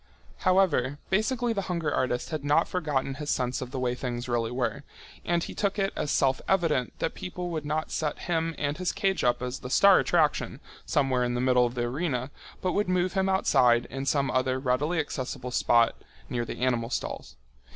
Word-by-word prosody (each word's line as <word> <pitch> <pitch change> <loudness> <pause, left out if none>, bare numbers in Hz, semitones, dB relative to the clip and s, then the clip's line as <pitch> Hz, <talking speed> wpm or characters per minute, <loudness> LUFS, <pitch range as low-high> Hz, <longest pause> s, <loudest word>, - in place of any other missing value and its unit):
However, 175 -8 +2
basically 230 +4 +1
the 200 - -1
hunger 170 -4 -1
artist 125 +2 -1
had 155 -3 -3
not 145 +3 +3
forgotten 145 -6 -1
his 150 - -4
sense 125 0 0
of 130 - -5
the 130 - -6
way 125 -1 0
things 125 -1 -4
really 120 -2 0
were, 125 +3 -2 0.4
and 170 -1 0
he - - -6
took 200 0 -1
it 195 -1 0
as 150 - -2
self 135 -1 +2
evident 165 -9 +1
that - - -2
people 180 -1 -5
would 155 -3 -3
not 155 +1 -2
set 150 -2 -1
him 165 -1 -1
and 145 +2 -2
his 185 0 0
cage 195 -1 0
up 125 0 +2
as 125 +1 -4
the 125 - -7
star 195 +7 +6
attraction 150 -6 +1 0.3
somewhere 135 -4 +2
in 120 0 -1
the - - -1
middle 125 -1 +4
of 120 - -8
the 120 - -1
arena, 130 0 -2 0.3
but 185 - +1
would 205 +1 0
move 185 0 +1
him 190 0 +1
outside 125 -11 +3
in 135 +2 -4
some 140 -1 +1
other 130 0 +1
readily 135 +6 0
accessible 130 -4 -4
spot 120 -1 +3 0.4
near 120 -1 -2
the - - -7
animal 120 -2 +1
stalls. - - -4
140 Hz, 200 wpm, -27 LUFS, 125-175 Hz, 0.4 s, star